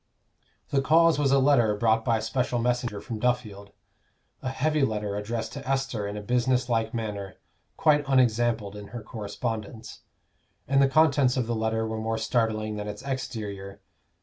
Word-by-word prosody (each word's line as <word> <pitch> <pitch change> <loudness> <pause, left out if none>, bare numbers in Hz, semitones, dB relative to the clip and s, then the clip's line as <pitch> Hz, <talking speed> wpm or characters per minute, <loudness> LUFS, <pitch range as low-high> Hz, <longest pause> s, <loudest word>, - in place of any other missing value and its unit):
The 135 - +2
cause 160 +2 +4
was 140 -2 +2
a 140 - +5
letter 130 -6 +4
brought 110 +1 +2
by 115 -2 +2
a 110 - -4
special 125 +2 -1
messenger 120 -3 -1
from 115 -3 -6
Duffield; 110 -4 -1 0.7
a 130 - -3
heavy 150 +3 0
letter 105 -5 -1
addressed 110 +3 -3
to 130 - -7
Esther 135 -6 -1
in 100 +1 -5
a 105 - -6
business 125 +2 +1
like 115 -2 +1
manner, 105 -4 -4 0.4
quite 150 -1 +4
unexampled 120 -5 +2
in 105 -1 -8
her 115 +2 -8
correspondence. 110 +1 -5 0.7
And 135 +1 +3
the 135 - +4
contents 140 -3 +4
of 125 - +1
the 120 - -2
letter 110 0 0
were 110 0 -3
more 110 0 -1
startling 110 -2 0
than 105 0 -4
its 105 0 -7
exterior. 110 -8 -5
115 Hz, 170 wpm, -27 LUFS, 110-130 Hz, 0.7 s, a